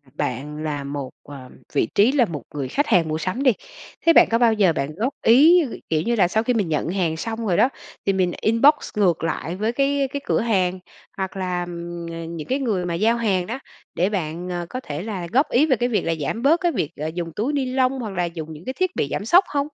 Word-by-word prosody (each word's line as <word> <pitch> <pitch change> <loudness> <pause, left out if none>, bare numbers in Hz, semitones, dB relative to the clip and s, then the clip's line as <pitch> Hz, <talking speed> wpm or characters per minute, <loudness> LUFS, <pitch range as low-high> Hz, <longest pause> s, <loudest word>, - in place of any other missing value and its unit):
bạn 145 +2 -3
là 150 -2 -3
một, 140 -1 -5
ờ, 135 -3 -11 0.2
vị - - +2
trí 215 +5 +5
là 270 -4 +3
một 150 - -6
người 135 -3 -2
khách 290 - 0
hàng 175 -7 +3
mua 155 - -1
sắm 185 - -2
đi, 255 - +6 0.5
thế 330 - +7
bạn - - +7
có 230 - +4
bao 235 -2 +4
giờ 195 -6 +3
bạn 140 +3 -3
góp 245 +8 -1
ý, 305 +10 +7 0.3
kiểu 155 -1 +1
như 235 +4 0
là, 190 -5 +4
sau 220 +5 0
khi 250 - +1
mình 205 -7 0
nhận 155 +1 -1
hàng 170 -4 -1
xong 225 +4 -4
rồi 175 - +1
đó, 255 - +4 0.4
thì 195 - +2
mình 185 -2 +1
inbox 230 +7 +5 0.2
ngược 180 -6 +2
lại 165 +1 -2
với 215 +4 -1
cái 275 +1 +1
cái 285 - -3
cửa - - +1
hàng, 185 -5 +1 0.4
hoặc 190 0 -4
là, 180 -1 -2
ừm, 170 0 -6 0.3
những 155 - -7
cái 265 +2 0
người 205 -9 -1
mà 170 - -2
giao 225 +7 +2
hàng 195 -6 0
đó, 250 +4 -4 0.4
để 180 +4 +1
bạn, 175 -2 -3
ờ, 175 -1 -3
có 255 - -4
thể 150 - -6
là 195 -5 -4
góp 275 +5 +3
ý 285 +6 +4
về 270 - +3
cái 245 +2 -1
việc 225 - +1
là 165 0 0
giảm 225 +11 -2
bớt 320 +5 +4
cái 345 -2 +2
việc, 150 - -2
ờ, 155 +2 -3
dùng 170 -2 -4
túi 240 +8 -1
ni 275 -2 0
lông, 255 +1 +1
hoặc 220 -3 -4
là 180 -1 0
dùng 160 -2 -6
những 155 +4 -12
cái 260 - -3
thiết 370 +4 -1
bị 140 - 0
giảm 200 - -3
sốc 360 - +5
hông? 285 - -1
195 Hz, 255 wpm, -22 LUFS, 165-250 Hz, 0.5 s, thế